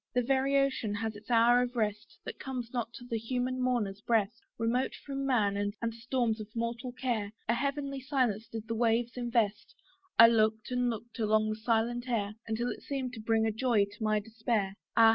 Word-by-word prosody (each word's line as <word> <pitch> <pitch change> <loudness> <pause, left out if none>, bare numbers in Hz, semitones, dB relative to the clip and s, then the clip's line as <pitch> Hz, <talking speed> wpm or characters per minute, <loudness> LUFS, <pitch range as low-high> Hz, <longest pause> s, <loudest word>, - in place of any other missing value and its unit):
The 250 - +3
very 270 +2 +2
ocean 265 -6 +1
has 220 +1 -3
its 205 - -13
hour 240 +1 +5
of 250 0 -2
rest, 210 -2 -2
That - - -7
comes 250 -3 -5
not 240 -2 -2
to 245 - -10
the 230 -2 -2
human 250 +2 -2
mourner's 220 -6 0
breast. 225 +1 +1 0.2
Remote 235 +3 0
from 275 -1 -4
man, 210 -6 +2
and 205 +3 -2
storms 230 -1 -1
of 210 - -7
mortal 235 +2 -2
care, 235 -5 -2
A 230 - +3
heavenly 275 +2 -2
silence 250 -6 0
did 225 -1 -7
the 230 - -2
waves 230 +1 +1
invest; 230 -4 0 0.4
I 230 - +11
looked 220 0 +2
and 250 0 +1
looked 235 +1 -6
along 215 0 +2
the 215 - -1
silent 235 +2 0
air, 210 -4 0
Until 235 +2 -1
it - - -7
seemed 265 -3 -3
to 225 - -7
bring 220 0 +2
a 220 - +2
joy 220 -2 +2
to 205 +3 -9
my 215 0 +2
despair. 220 -2 -1 0.2
Ah! 225 -1 +8
230 Hz, 200 wpm, -31 LUFS, 220-250 Hz, 0.4 s, I